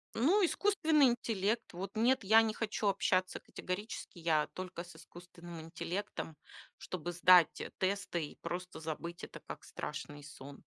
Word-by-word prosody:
Ну, 355 - +4
искусственный 320 -7 +4
интеллект. 225 -4 0
Вот 190 +5 -6
нет, 235 +2 +3
я 220 +3 +7
не 220 -1 0
хочу 215 -1 -2
общаться 185 -1 +1
категорически. 185 0 -6
Я 160 -2 +2
только 180 -2 -5
с 175 - -13
искусственным 175 -1 -11
интеллектом, 170 -1 -5 0.4
чтобы 175 -1 -5
сдать, 175 -1 +6
э, - - -6
тесты 190 -3 0
и - - -14
просто 180 0 -5
забыть 170 +2 -5
это - - -8
как - - -9
страшный 145 -1 -6
сон. 140 -1 -11
185 Hz, 145 wpm, -34 LUFS, 170-220 Hz, 0.4 s, я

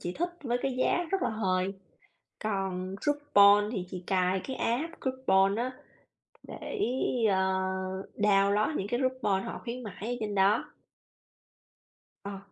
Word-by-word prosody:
chị 175 - -3
thích 350 - -1
với 245 -1 0
cái 270 - 0
giá 350 +6 +2
rất 390 -2 0
là - - +2
hời. 190 -3 0 0.7
Còn 190 -3 -2
coupon 210 -8 +5
thì 190 -6 -2
chị 180 -1 -7
cài 185 0 +1
cái 265 - -4
app 305 +9 -2
coupon 205 -7 +2
á 245 +2 -1 0.7
để, - - -7 0.5
ờ, 190 - +2 0.8
download 205 +5 +3
những 195 - -2
cái 240 +3 -1
coupon 255 -7 0
họ - - -6
khuyến 245 +1 -5
mãi 215 0 -7
ở 245 - -1
trên 210 -1 -3
đó. 200 +4 +3 1.6
Ờ. 200 -1 -5
210 Hz, 145 wpm, -29 LUFS, 195-255 Hz, 1.6 s, coupon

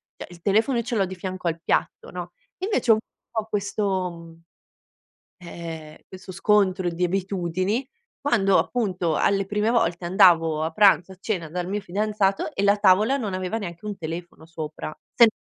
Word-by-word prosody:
cioè - - -9
il 170 - -13
telefono 220 +7 +2
io 235 - 0
ce 240 +1 -3
l'ho 200 -3 +2
di 190 - -7
fianco 185 0 -5
al 165 0 -1
piatto, - - -1
no? 180 -1 -7 0.3
Invece 375 - +1
ho - - +9
un 215 - +1 0.3
po' 220 -2 -2
questo, 200 -3 -1
mhmm, 165 -1 -13 1.1
ehm, 160 -3 -8
questo 185 0 -11
scontro 185 -2 +2
di 175 +2 -1
abitudini 190 +5 -1 0.3
quando 205 -9 +3
appunto 185 -9 0
alle 195 -1 +2
prime 210 +2 0
volte 175 -7 +1
andavo 165 -3 +4
a 160 - -1
pranzo, 190 -1 +4
a - - -13
cena 185 -6 -3
dal 180 +3 -4
mio 205 +2 -2
fidanzato 200 +1 0
e 195 - -1
la 200 +1 +4
tavola 210 +6 +4
non 220 -8 -3
aveva 185 +4 -2
neanche 175 -2 -7
un 205 -2 -4
telefono 165 0 -7
sopra. 155 -2 -6 0.2
Sem 235 - +8
190 Hz, 175 wpm, -24 LUFS, 170-210 Hz, 1.1 s, ho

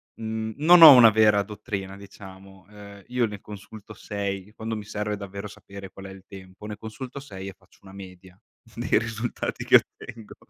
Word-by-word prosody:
mhmm, 110 0 -5
non 170 +3 +6
ho 155 -3 +13
una 115 -3 +8
vera 105 -1 +3
dottrina, 100 -2 -7
diciamo. 95 -1 -14
Ehm, 100 -1 -14
io 125 -1 0
ne 105 -1 -9
consulto 110 +1 -12
6, 100 -1 -6
quando 110 0 -5
mi 105 - -6
serve 105 0 -4
davvero 100 +1 -8
sapere 100 -1 -12
qual 95 - -12
è - - -10
il 95 -1 -14
tempo, 95 +1 -13
ne 105 -1 -7
consulto 125 +5 -9
6 100 -8 -9
e - - -11
faccio 95 -1 -27
una 95 0 -14
media 95 -1 -13 0.4
dei - - 0
risultati 115 +1 -5
che - - +5
ottengo. 110 -2 -9
105 Hz, 185 wpm, -24 LUFS, 95-110 Hz, 0.4 s, ho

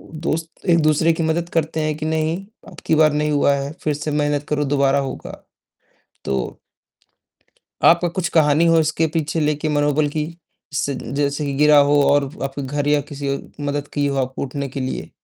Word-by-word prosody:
दोस्त 160 +2 -5
एक-दूसरे 160 -1 +4
की 165 - -2
मदद 165 +2 0
करते 160 0 0
हैं 155 0 0
कि 155 0 -4
नहीं, 160 +1 0 0.3
अब - - -13
की - - +3
बार 155 -1 +4
नहीं 150 0 0
हुआ 145 -1 +3
है, 140 +1 -3
फिर 150 - 0
से 150 +1 -4
मेहनत 145 -1 0
करो 150 -1 0
दोबारा 140 0 +2
होगा। 135 -1 -6 0.8
तो 65 -2 -2 1.3
आपका 170 +1 +5
कुछ 175 +1 -2
कहानी 155 0 +4
हो 165 0 +5
इसके 160 +1 +1
पीछे 160 0 -1
लेके 150 +1 0
मनोबल 145 0 +1
की 150 0 -2 0.5
सी 140 0 -1 0.2
जैसे 145 +1 0
गिरा 150 0 +5
हो 145 - +4
और 145 0 +3 0.2
आपके 135 +1 -4
घर 145 +2 -2
या 150 0 +3
किसी 140 -1 -4
औ - - -7 0.3
मदद 145 0 -3
की 145 -1 +1
हो 140 - -1
आपको 130 +1 -7
उठने 140 +1 -4
के 135 +1 -6
लिए? 130 0 -4
150 Hz, 185 wpm, -20 LUFS, 145-160 Hz, 1.3 s, आपका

